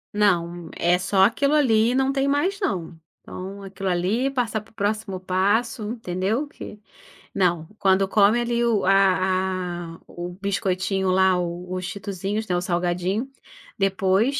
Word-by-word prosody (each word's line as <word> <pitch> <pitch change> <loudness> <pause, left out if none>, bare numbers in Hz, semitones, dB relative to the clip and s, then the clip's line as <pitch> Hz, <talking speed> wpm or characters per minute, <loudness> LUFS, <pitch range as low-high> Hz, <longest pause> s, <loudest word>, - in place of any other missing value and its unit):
Não. 175 -4 +1
É 175 +1 +2
só 190 +1 +3
aquilo 280 +8 +3
ali, 235 -4 +3
não 265 0 +2
tem 275 0 +1
mais 350 +9 +1
não. 180 - -2 0.3
Então, 195 +2 -8
aquilo 195 0 -4
ali, 190 +9 +1
passar 240 -5 -1
para 215 - -20
o - - -31
próximo 205 -2 -2
passo, 200 +6 0
entendeu? 220 +5 -2
Que 210 -7 -10 0.5
não. 175 -4 +1
Quando 195 -1 +3
come 210 +3 +4
ali 240 0 0
o 225 -4 +2
ah 185 -3 +1
ah, - - -25
o 175 0 -6
biscoitinho 190 -1 0
lá, 190 -1 +4
o 175 +1 -4
os 185 0 -4
cheetosinhos, 200 +2 -4
né, 180 - 0
o - - -1
salgadinho, 180 +6 -1 0.5
depois, 195 +6 +2
195 Hz, 150 wpm, -23 LUFS, 185-225 Hz, 0.5 s, come